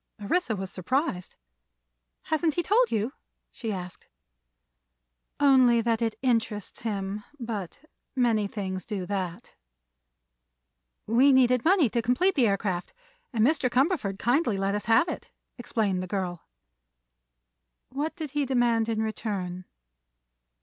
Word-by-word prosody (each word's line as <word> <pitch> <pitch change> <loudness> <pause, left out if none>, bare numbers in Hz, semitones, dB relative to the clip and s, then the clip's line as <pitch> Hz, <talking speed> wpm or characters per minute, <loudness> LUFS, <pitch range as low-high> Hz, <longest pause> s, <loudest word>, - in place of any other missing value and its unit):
Orissa 220 - 0
was 190 -1 -5
surprised. 195 - -2 0.9
"Hasn't 315 -1 0
he 345 - 0
told 460 +7 +3
you?" 225 +5 -1 0.4
she 225 -3 -5
asked. 180 -3 -7 1.3
"Only 255 -4 +5
that 230 0 0
it 225 -1 0
'interests 225 -5 -1
him;' 205 -2 -3 0.2
but 225 - -6 0.3
many 230 -5 +2
things 190 -3 -4
do 200 -5 -4
that." 190 +1 -4 1.5
"We 250 +6 +5
needed 250 -2 +4
money 345 -4 +4
to 235 - +1
complete 250 - +2
the 255 -8 +3
aircraft, 195 - -1 0.4
and 225 -2 +2
Mr. 275 -2 +2
Cumberford 255 - +1
kindly 240 -1 +1
let 195 +1 0
us 205 0 -2
have 230 +8 +4
it," - - -6 0.3
explained 210 -6 -1
the 185 - -5
girl. 180 -3 -4 1.4
"What 290 +4 -3
did 310 -6 -6
he 295 0 0
demand 240 -3 +2
in 220 -1 0
return?" 190 -5 -4
225 Hz, 125 wpm, -27 LUFS, 200-260 Hz, 1.5 s, Only